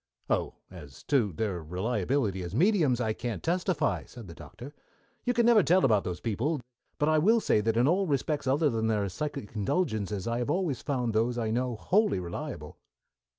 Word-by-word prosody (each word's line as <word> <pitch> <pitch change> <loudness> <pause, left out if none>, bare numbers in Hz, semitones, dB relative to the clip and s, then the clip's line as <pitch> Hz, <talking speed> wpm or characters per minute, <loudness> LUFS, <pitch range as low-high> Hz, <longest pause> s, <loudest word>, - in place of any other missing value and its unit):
"Oh, - - 0 0.2
as 75 -8 -12
to 125 -9 +3
their 95 0 -3
reliability 100 - -1
as 90 +2 -6
mediums 160 - +3
I 110 -3 0
can't 120 +1 -5
testify," 180 +1 0
said 120 -5 -11
the 85 - -9
Doctor. 120 - -11 0.5
"You 245 - +2
never 235 -1 +5
can 195 - +2
tell 185 +3 +5
about 110 -6 +3
those 90 -1 -4
people, 125 +8 -1 0.4
but 150 - +1
I 155 0 +4
will 220 +9 +4
say 105 - +2
that 110 +1 0
in 120 +3 +4
all 190 +4 +2
respects 145 0 -1
other 145 +2 +2
than 110 -1 -1
their 105 -3 +1
psychic 140 0 -5
indulgences 105 - -1
I 115 +1 -1
have 125 - -2
always 160 -5 -1
found 125 -5 -1
those 115 +3 +1
I 110 -2 -1
know 125 +1 -1
wholly 200 - +1
reliable." 85 -1 -7
120 Hz, 190 wpm, -28 LUFS, 105-155 Hz, 0.5 s, never